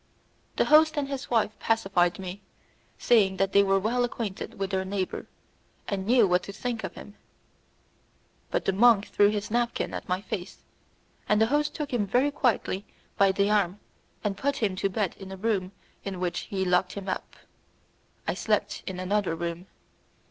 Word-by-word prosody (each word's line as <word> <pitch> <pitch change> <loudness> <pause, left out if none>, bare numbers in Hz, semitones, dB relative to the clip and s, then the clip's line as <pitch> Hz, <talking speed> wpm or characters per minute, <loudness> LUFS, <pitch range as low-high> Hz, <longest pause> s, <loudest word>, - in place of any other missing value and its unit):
The - - +2
host 310 +1 +5
and 285 -1 0
his 275 -1 -5
wife 225 -3 +2
pacified 195 -5 +2
me, 190 +1 -7 0.6
saying 200 -5 +3
that 195 0 +1
they 200 - +7
were 195 -1 +3
well 230 +5 +1
acquainted 230 -5 -4
with 195 0 -2
their 190 -1 0
neighbour, 190 -1 -3 0.6
and 195 -1 -3
knew 240 -3 +5
what 180 0 +3
to 200 - -8
think 230 +2 -4
of - - -5
him; 205 - -10 1.4
but - - -1
the 195 - +2
monk 210 0 +5
threw 205 0 +4
his 210 0 -3
napkin 240 +1 0
at - - -6
my 180 +1 +1
face, 190 -1 -6 0.7
and 210 - +4
the 220 - +5
host 295 0 +1
took 295 -4 -4
him 210 -4 +1
very 250 +8 +2
quietly 235 -8 0 0.3
by 195 -1 +4
the 200 +2 +1
arm 200 -2 +1 0.4
and 205 -2 -1
put 280 0 0
him 205 -7 0
to 195 - 0
bed 195 -1 -1
in 195 -1 -9
a 190 - -6
room 195 -3 -1 0.3
in 195 -2 -5
which 180 -1 -1
he 190 -1 -1
locked 180 0 +2
him 200 -1 -7
up. 185 - -4 0.9
I - - +1
slept - - -1
in 185 -1 -4
another 185 -2 0
room. 170 +2 -4
200 Hz, 180 wpm, -27 LUFS, 190-230 Hz, 1.4 s, they